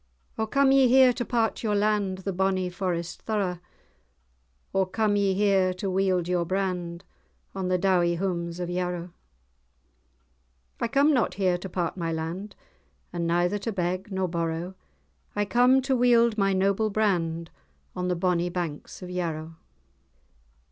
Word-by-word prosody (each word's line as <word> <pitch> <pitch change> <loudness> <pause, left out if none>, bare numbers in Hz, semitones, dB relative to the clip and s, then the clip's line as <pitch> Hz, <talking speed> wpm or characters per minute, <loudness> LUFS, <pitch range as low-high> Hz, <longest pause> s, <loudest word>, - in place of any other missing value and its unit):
"O 220 - -1
come 275 +3 +3
ye 270 -1 +6
here 255 0 +6
to 240 0 -3
part 230 -2 0
your 210 -2 0
land, 205 -2 +1
The 195 - -1
bonnie 185 -1 0
forest 175 -2 -3
thorough? 195 -5 -2 1.1
Or 190 -1 +2
come 210 +1 +1
ye 200 -2 +2
here 190 -2 +2
to 190 +1 -3
wield 185 -2 +1
your 180 -1 +1
brand, 180 -1 -2 0.5
On 190 -1 -3
the 185 0 +2
dowie 175 -2 +2
houms 170 -2 -3
of 175 - -2
Yarrow?" 175 -1 -3 1.7
"I - - 0
come 280 +5 +3
not 250 -5 +1
here 185 -2 +2
to 190 - -7
part 175 0 -2
my 165 -2 -2
land, 165 +6 -5 0.6
And 170 -1 -2
neither 175 +4 +1
to 225 - -3
beg 185 +1 -2
nor 190 -1 0
borrow, 170 +1 -3 0.6
I 205 0 +1
come 250 +4 +4
to 270 0 +1
wield 235 -2 +4
my 195 -2 +2
noble 195 +3 +1
brand 170 -6 0 0.4
On 180 0 -2
the 180 - 0
bonnie 175 0 0
banks 175 -1 -5
of 180 - -7
Yarrow. 165 -3 -4
185 Hz, 155 wpm, -26 LUFS, 175-210 Hz, 1.7 s, ye